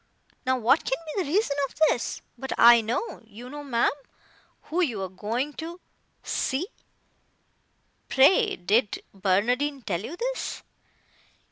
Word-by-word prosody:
Now 260 0 +3
what 250 +6 +3
can 265 - -1 0.2
be 390 - +1
the 290 - -4
reason 385 -5 +2
of - - -19
this? 240 - -2
But 265 +2 -4
I 235 0 +8
know, 235 - -3
you 245 +4 -11
know, 295 0 -7
ma'am, 240 -5 +2 0.7
who 345 +4 -1
you 245 - 0
are - - -2
going 230 +10 -3
to 340 +2 -7 0.4
see." 270 +7 -1 1.4
"Pray 385 - +5
did 205 +5 +1
Barnardine 240 +9 +1
tell 175 -4 -2
you 290 +9 -6
this?" - - -3
260 Hz, 135 wpm, -26 LUFS, 225-300 Hz, 1.4 s, I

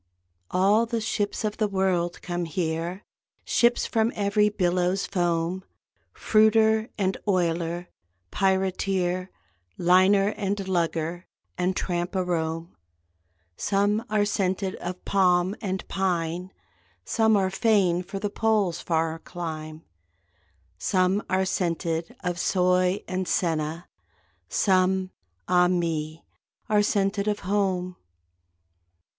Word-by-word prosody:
All 205 +5 +3
the 230 0 -1
ships 210 -1 -2
of 210 -1 -2
the 215 - +1
world 190 -3 0
come 175 -1 -2
here, 165 +3 -3 0.4
Ships 240 0 +3
from 225 +1 +1
every 210 +1 +2
billow's 180 -1 0
foam; 175 -1 -1 0.5
Fruiter 220 +1 +3
and 190 -2 0
oiler, 175 -2 0 0.4
pirateer, 190 -1 0 0.5
Liner 185 +3 +4
and 200 -2 -3
lugger 170 -1 -1 0.3
and 180 +1 0
tramp 175 +1 -2
a 185 - +1
roam. 165 -1 -3 0.8
Some 205 - +1
are 210 -1 +2
scented 190 -1 -1
of 180 +1 -6
palm 185 0 +2
and 190 -3 -3
pine, 180 -1 -2 0.5
(Some 220 -1 +3
are 190 -1 +1
fain 195 -4 +2
for 195 +2 -7
the 205 +1 -3
Pole's 210 -7 +1
far 165 -1 -1
clime). 160 -2 -7 1.0
Some 185 - +2
are 190 +1 +2
scented 170 -3 -2
of 175 -1 -2
soy 180 +1 +2
and 185 0 -2
senna, 160 -1 -1 0.6
Some 185 -1 +2 0.4
ah 180 0 +4
me! 165 -3 -2 0.4
are 210 -1 +3
scented 200 0 0
of 210 -1 -1
home. 185 -2 -1
185 Hz, 110 wpm, -26 LUFS, 175-200 Hz, 1.0 s, Liner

